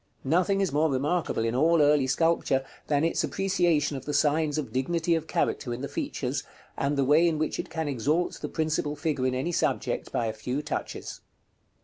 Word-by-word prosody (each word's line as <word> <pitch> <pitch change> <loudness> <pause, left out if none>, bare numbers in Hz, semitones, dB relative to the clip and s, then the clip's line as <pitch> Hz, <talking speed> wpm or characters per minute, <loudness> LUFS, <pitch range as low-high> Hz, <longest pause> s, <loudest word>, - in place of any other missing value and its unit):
Nothing 185 +7 +2
is 195 - +1
more 155 +3 +2
remarkable 140 -2 0
in 115 - 0
all 160 +6 +3
early 145 -2 +4
sculpture, 135 -2 +1 0.2
than 145 0 +2
its 165 - +1
appreciation 175 -6 +1
of 135 - -7
the 150 - -2
signs 150 +1 +2
of 150 - -4
dignity 165 +6 0
of 160 -1 -1
character 120 -5 -1
in 125 - -8
the 140 - -3
features, - - -3 0.3
and 140 +1 -1
the 135 - +2
way 155 +5 +5
in 160 -2 +1
which 155 0 -2
it - - -4
can 160 -2 -3
exalt 145 +6 0
the - - -4
principal 155 -2 -1
figure 145 -4 -1
in 130 - 0
any 135 +7 -1
subject - - -1
by 120 - 0
a 110 - -2
few 125 +6 -3
touches. 150 - -5
150 Hz, 200 wpm, -27 LUFS, 135-165 Hz, 0.3 s, way